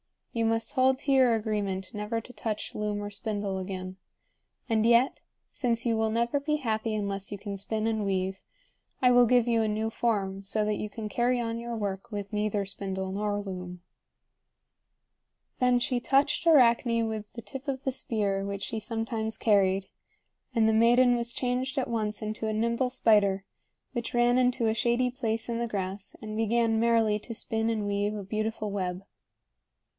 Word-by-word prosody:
You 230 -1 0
must 225 0 0
hold 260 -1 +4
to 280 - -1
your 260 -3 +5
agreement 205 -3 -2
never 210 +2 -2
to 250 - -13
touch 215 -3 -4
loom 210 -1 -2
or 205 - -5
spindle 200 -2 -3
again. 185 0 -5 0.7
And 220 -1 +2
yet, 235 +3 +4 0.3
since 235 -2 -1
you 230 -1 +2
will 220 0 +1
never 235 +5 +1
be 300 +2 0
happy 225 -5 -1
unless 200 -1 -3
you 205 - -4
can 200 0 -6
spin 215 +2 -2
and 220 -1 0
weave, 190 -1 -1 0.6
I 250 -1 +5
will 245 -1 +6
give 245 0 +4
you 230 -1 +3
a 220 - +1
new 215 +1 -1
form 195 -5 -1
so 210 +2 0
that 210 -1 0
you 210 - -4
can 215 +1 -6
carry 245 +3 +1
on 230 -1 -2
your 235 0 -4
work 200 0 -4
with 205 -1 -5
neither 210 -1 0
spindle 190 -1 -4
nor 205 +1 -1
loom." 180 -2 -7 1.8
Then 250 -1 +4
she 245 0 0
touched 285 +6 +2
Arachne 235 -5 +5
with 215 -1 -5
the 235 - -7
tip 270 +1 -8
of 270 -1 -3
the 265 - 0
spear 205 -6 -1
which 200 0 -4
she 225 - -3
sometimes 225 0 -3
carried; 195 -3 +3 0.7
and 225 -1 +4
the 220 - +3
maiden 240 +2 +5
was 235 0 -1
changed 255 +2 -1
at 265 - 0
once 215 -2 -2
into 215 +1 -3
a 215 - -1
nimble 235 +3 +1
spider, 205 -6 +3 0.5
which 240 0 -4
ran 240 +1 +4
into 250 -2 +2
a 220 - +2
shady 240 +2 +1
place 225 -3 -2
in 235 -1 -2
the 235 - -1
grass 195 -2 -4
and 215 0 -5
began 225 0 +2
merrily 225 -2 +3
to 230 +2 -7
spin 225 0 -1
and 215 -2 -1
weave 205 +1 0
a 205 - -5
beautiful 215 +1 -2
web. 185 -1 -3
220 Hz, 180 wpm, -28 LUFS, 205-235 Hz, 1.8 s, will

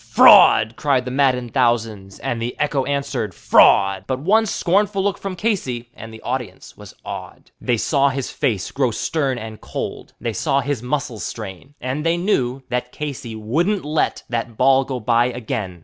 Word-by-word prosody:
"Fraud," 110 +1 +6
cried 135 -4 +1
the 125 - -4
maddened 125 -3 +1
thousands, 115 -6 0
and 115 -1 -3
the 120 +1 -4
echo 145 -3 0
answered 135 -8 -2
"Fraud," 95 -1 +4
But 130 - -1
one 215 +9 +3
scornful 195 +1 +1
look 200 -1 -1
from 195 -2 -5
Casey, 130 - -2
and 115 0 -10
the 110 - -11
multitude 120 -7 -5
was - - -13
awed. - - -8
The 120 - +1
saw 140 +4 +2
his 135 -1 -4
face 100 -7 -1
grow 130 -3 +1
stern 135 +3 -1
and 110 -1 -8
cold; - - -6
they 115 -2 -3
saw 135 +5 +1
his 140 -5 -2
muscles 125 -3 -3
strain, 110 +6 -8
And 130 +4 -3
they 165 +1 +1
knew 135 -9 0
that 125 0 -2
Casey 135 -6 -6
wouldn't 160 - -1
let 155 +1 -1
that 115 -1 -4
ball 135 +1 +4
go 130 -2 -4
by 120 +1 +2
again. 110 -7 -4
125 Hz, 175 wpm, -20 LUFS, 115-145 Hz, -, Fraud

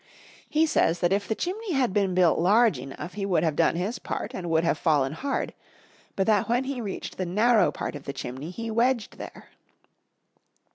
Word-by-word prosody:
He 310 +1 +3
says 170 - +2
that 175 +2 +3
if 200 0 -1
the 220 - -1
chimney 385 - -3
had 255 -8 +1
been 195 -3 +1
built 180 -3 +4
large 205 - +4
enough 135 +7 -8
he 205 - -4
would 180 -5 +1
have 160 -3 +1
done - - +3
his 195 +8 -2
part - - -5
and 175 -2 -5
would 165 0 +2
have 165 -3 +1
fallen 145 -5 +2
hard, 275 - -3 0.6
but 195 - +1
that 215 0 +2
when 245 +2 +2
he 265 -2 -4
reached 205 -4 -6
the 185 - -2
narrow 215 +5 +3
part - - -5
of 145 -2 -9
the - - -3
chimney 130 +6 -6
he 225 +5 -5
wedged 235 0 0
there. - - -10
195 Hz, 200 wpm, -26 LUFS, 165-235 Hz, 0.6 s, built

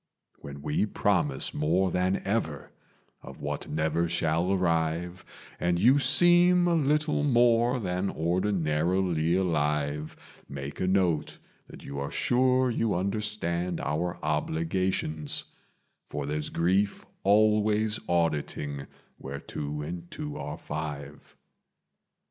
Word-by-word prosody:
"When 70 0 -9
we 75 +9 0
promise 85 -10 0
more 85 +5 +1
than 90 +2 0
ever 95 -9 -2 0.5
of - - -11
what - - -4
never 80 +2 0
shall 85 +2 +1
arrive, 85 -1 0 0.4
And 85 0 +1
you 125 +10 +5
seem 175 +5 +5
a 175 - +3
little 150 -1 +1
more 120 -2 +3
than 90 -1 -1
ordinarily 85 -1 0
alive, 75 -4 -1 0.3
Make 70 +1 -6
a 90 - +1
note 90 -5 +1 0.3
that - - -12
you 70 0 -5
are 70 - -3
sure 130 0 +2
you 115 -3 0
understand 90 -3 -2
our 85 +4 -2
obligations 80 0 -1 0.6
For - - -4
there's 75 +1 -3
grief 95 +4 0 0.2
always 105 +1 +3
auditing 75 -4 -1 0.3
where 70 +1 -6
two 75 +1 -5
and 85 +2 -6
two 150 -1 -6
are 75 - -5
five. 75 -1 -7
90 Hz, 115 wpm, -28 LUFS, 75-105 Hz, 0.6 s, you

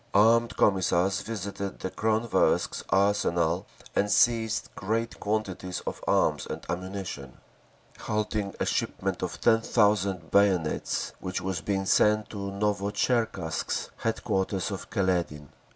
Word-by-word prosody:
Armed 115 +3 +4
Commissars 95 -1 +2
visited 100 -3 -5
the 95 - -5
Kronversk 110 +1 +1
arsenal 90 -4 +2 0.3
and 105 - +2
seized 110 -1 +2
great 115 +4 -2
quantities 100 -4 -2
of - - -6
arms - - +2
and - - -6
ammunition, 90 -7 -5 0.6
halting 105 -2 -2
a - - +1
shipment - - -1
of - - -4
ten 115 -1 +4
thousand 100 -6 +1
bayonets 95 -6 +1
which 90 0 -3
was 95 -1 -3
being 95 -1 -1
sent 105 +2 +3
to 100 -2 -4
Novotcherkask, 100 -2 -1
headquarters 95 0 -1
of 95 - -6
Kaledin…. 85 - -1
100 Hz, 115 wpm, -27 LUFS, 95-105 Hz, 0.6 s, Armed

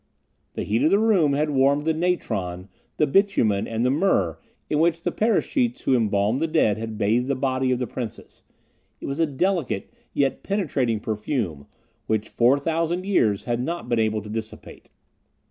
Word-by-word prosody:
The - - -3
heat 110 +4 0
of 155 - +4
the 200 - +4
room 200 -10 +3
had 150 +2 0
warmed 140 +2 +2
the 160 - +2
natron, 105 - -2 0.3
the 150 - +3
bitumen, 135 - +2
and 115 +1 -1
the 125 - +3
myrrh 135 - +1 0.3
in 150 - 0
which 165 0 +2
the - - 0
paraschites 235 +3 0
who 130 - +2
embalmed 105 +1 +1
the 165 - +1
dead 110 -10 +2
had 110 -1 -5
bathed 115 +4 +1
the 140 - 0
body 130 0 0
of 125 - +2
the 125 - -2
Princess; 120 -3 -7 0.6
it - - -8
was 140 +3 -4
a 165 - +3
delicate, 170 - -1 0.2
yet 140 -2 0
penetrating 140 - -1
perfume, 105 - -3 0.4
which 110 0 -1
four 125 +4 +3
thousand 165 +4 -1
years 110 - +2
had 120 -1 -1
not 170 +6 -4
been 120 - +1
able 110 -1 0
to 105 - -9
dissipate. 110 0 -7
130 Hz, 180 wpm, -24 LUFS, 110-165 Hz, 0.6 s, of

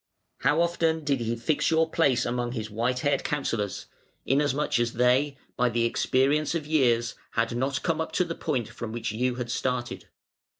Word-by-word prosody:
How 150 +3 +2
often 165 -2 +1
did 140 -2 +1
he 115 0 -1
fix 145 +6 0
your 160 0 +3
place 140 -7 +2
among 120 0 -2
his 110 -3 -5
white 120 +4 -1
haired 145 - +1
counsellors; 115 -9 -2 0.4
inasmuch 145 -1 +1
as 120 -1 0
they, 130 +4 +2 0.2
by 125 0 +2
the 115 0 +1
experience 140 +6 +1
of 160 -3 -2
years, 120 -6 +2 0.2
had 115 +1 0
not 135 +3 -1
come 165 -2 0
up 160 - -4
to 180 - +2
the 165 - -4
point 135 -9 -2
from 120 -2 -7
which 115 -1 -3
you 125 +3 0
had 120 -1 -4
started! 125 -1 -2
130 Hz, 180 wpm, -27 LUFS, 120-150 Hz, 0.4 s, your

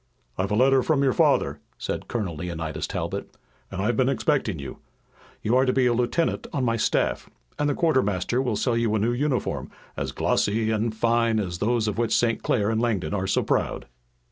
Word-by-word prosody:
"I've 95 +1 -1
had 105 - +1
a - - +6
letter 135 0 +4
from 140 0 +1
your 135 -2 +3
father," - - +2 0.2
said - - -4
Colonel 100 -9 -3
Leonidas 80 -1 -4
Talbot, - - -4 0.4
"and 95 0 -4
I've 120 +2 +1
been 130 +3 +2
expecting 135 - 0
you. 70 -3 -8 0.6
You 110 +3 +2
are 130 - +5
to - - +4
be 130 -1 +3
a 120 - +3
lieutenant 125 +8 0
on 140 -5 -1
my 115 -2 +1
staff, 115 - 0 0.3
and 145 0 +2
the 145 - 0
quartermaster 125 - +1
will 125 -5 -1
sell 120 +3 0
you 115 -2 +1
a - - +1
new 115 +4 +1
uniform 130 -2 -1 0.3
as - - -3
glossy 110 +2 +1
and 110 0 -1
fine 115 0 +2
as 90 -4 -3
those 115 0 +1
of 105 +2 -2
which 115 -1 +2
St. 115 -2 +1
Clair 105 -2 +1
and 110 0 0
Langdon 110 -6 -1
are 95 -2 -1
so - - +1
proud." - - -1
115 Hz, 205 wpm, -25 LUFS, 105-125 Hz, 0.6 s, a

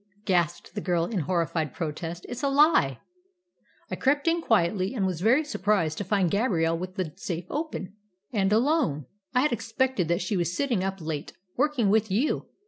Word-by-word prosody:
gasped 175 -3 0
the 205 - -4
girl, 175 -3 +1
in 210 0 -2
horrified 165 -2 -1
protest. 165 +1 -4
"It's 245 0 -6
a 280 - +1
lie!" 275 - +4 0.9
"I - - -1
crept 285 +3 +1
in 335 +1 +2
quietly, 195 - +1
and 200 -5 0
was 180 -3 -2
very 245 +9 +4
surprised 195 - 0
to - - -1
find 190 -2 +1
Gabrielle 180 -7 +1
with 185 +2 -6
the 175 -5 -3
safe 170 -1 -4
open, 295 - -4 0.4
and 195 -3 +1
alone. 225 - +2 0.3
I 250 - +5
had 295 - +2
expected 235 -3 0
that 170 +1 0
she 190 +3 -1
was 175 -1 -1
sitting 245 -9 0
up 195 -1 -3
late, 155 0 -4 0.2
working 260 -7 +2
with 220 0 +2
you. 230 +11 0
195 Hz, 180 wpm, -27 LUFS, 170-245 Hz, 0.9 s, I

